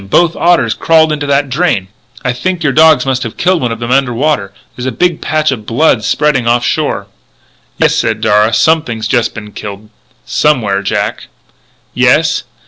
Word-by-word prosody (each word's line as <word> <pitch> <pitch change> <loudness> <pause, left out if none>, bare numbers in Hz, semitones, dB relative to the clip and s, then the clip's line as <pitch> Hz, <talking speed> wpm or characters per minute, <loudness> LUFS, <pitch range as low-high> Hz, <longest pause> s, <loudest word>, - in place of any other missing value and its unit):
Both 170 - +2
otters 165 -11 +2
crawled 160 -1 +2
into 145 -1 -3
the 140 0 +2
drain! 135 - -1 0.4
I 125 - +1
think 175 +7 -3
your 140 -3 +1
dogs 155 -3 +4
must 130 -1 -1
have 115 -4 -6
killed 180 -2 +1
one 120 - -1
of 115 - -4
them 120 +1 -4
under 135 -1 +2
water. 125 -7 -1 0.2
There's 125 +1 -5
a - - -1
big 175 +6 0
patch 155 -1 0
of 110 -5 -6
blood 125 -2 +2
spreading 140 -1 0
off 120 0 +2
shore." - - -1 0.7
"Yes," - - +2
said - - 0
Darragh, 105 +2 +2
"something 160 -8 +1
has 110 0 -4
just 120 +1 0
been 105 -2 -9
killed, 105 +1 -9 0.3
somewhere... 110 -10 +1
Jack!" 100 - -3 0.7
"Yes?" - - +2
130 Hz, 180 wpm, -12 LUFS, 115-155 Hz, 0.7 s, dogs